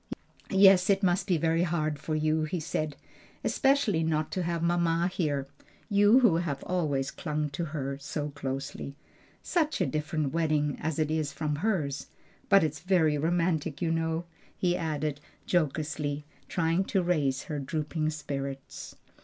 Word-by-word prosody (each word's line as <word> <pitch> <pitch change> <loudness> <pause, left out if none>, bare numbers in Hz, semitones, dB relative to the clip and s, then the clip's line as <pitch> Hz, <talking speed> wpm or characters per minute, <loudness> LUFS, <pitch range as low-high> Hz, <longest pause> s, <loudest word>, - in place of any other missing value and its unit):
"Yes, 195 -1 +6
it 200 0 +3
must 180 +1 +2
be 180 -4 +3
very 165 +1 +2
hard 155 -4 0
for 155 +1 -2
you," 155 +1 +1
he 170 +3 -2
said; 155 -1 -2 0.5
"especially 270 - +2
not 155 -1 0
to 185 - -1
have 170 -1 -1
mamma 170 0 +2
here, 145 -7 -1 0.4
you 205 +5 +6
who 205 -10 +5
have 155 -5 -2
always 145 -7 -1
clung 150 -2 -3
to 165 +4 -3
her 140 -3 -4
so 145 +1 -4
closely. 135 0 -5 0.5
Such 315 -4 0
a - - +2
different 155 -2 -2
wedding 150 -3 +1
as 160 -1 -2
it 155 -1 0
is 155 -2 0
from 150 0 -2
hers! 155 -8 -1 0.4
But 195 -3 +6
it's 150 -1 -1
very 165 -5 +2
romantic 165 -2 0
you 165 -2 0
know," 165 +1 -1 0.3
he 180 -1 +1
added 155 -3 -2 0.3
jocosely, 150 -3 -1 0.2
trying 165 +2 +1
to 190 -2 +1
raise 145 -6 +1
her 150 -2 -4
drooping 155 +2 -2
spirits. 140 -3 -5
155 Hz, 155 wpm, -29 LUFS, 150-175 Hz, 0.5 s, Yes